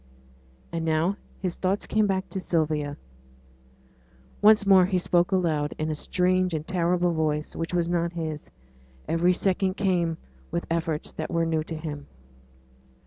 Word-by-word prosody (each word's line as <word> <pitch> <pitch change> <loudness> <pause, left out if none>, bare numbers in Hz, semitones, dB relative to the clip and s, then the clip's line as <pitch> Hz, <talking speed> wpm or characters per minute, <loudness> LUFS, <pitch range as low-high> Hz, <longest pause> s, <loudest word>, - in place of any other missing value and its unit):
And 165 -1 -2
now 165 +4 +1 0.2
his 185 -2 -3
thoughts 195 +2 0
came 215 -1 +2
back 190 -1 -1
to 190 - -4
Sylvia. 155 -5 -1 1.4
Once 210 0 +6
more 190 -2 +6
he 185 -1 +1
spoke 175 0 +2
aloud, 160 -6 0
in 155 0 -1
a - - 0
strange 180 +3 +1
and 155 0 -4
terrible 175 -1 +1
voice, 155 -1 -1
which 165 - -3
was 170 -1 +1
not 170 0 0
his. 160 -3 -5 0.6
Every 165 +2 +3
sound 190 +1 0
came 175 -5 +1 0.3
with 170 - -2
efforts 165 -2 -1
that 155 - -5
were 165 -1 +1
new 160 -1 0
to 160 - -5
him. 150 -2 -6
170 Hz, 150 wpm, -26 LUFS, 160-185 Hz, 1.4 s, Once